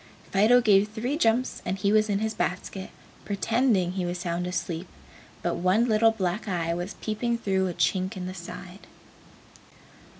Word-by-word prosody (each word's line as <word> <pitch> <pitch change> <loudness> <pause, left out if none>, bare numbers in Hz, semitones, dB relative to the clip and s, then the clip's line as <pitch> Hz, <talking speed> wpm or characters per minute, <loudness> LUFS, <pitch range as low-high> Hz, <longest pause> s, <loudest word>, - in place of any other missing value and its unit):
Fido 220 +6 +5
gave 205 -3 +5
three 240 +6 -2
jumps 250 -4 +1
and 185 +2 -2
he 200 +1 +1
was 215 0 +3
in 200 - +2
his 220 +1 -1
basket, 190 0 -3 0.3
pretending 215 -2 +1
he 185 0 -2
was 175 0 -2
sound 175 0 -2
asleep, 180 -1 -3 0.6
but - - 0
one 185 +6 +3
little 225 0 +5
black 205 -1 -2
eye 170 -3 -1
was 175 +4 -4
peeping 235 +2 -1
through 190 -4 0
a 180 - -3
chink 185 0 0
in 180 - -4
the 185 - -5
side. 180 +1 -9
195 Hz, 165 wpm, -26 LUFS, 180-220 Hz, 0.6 s, Fido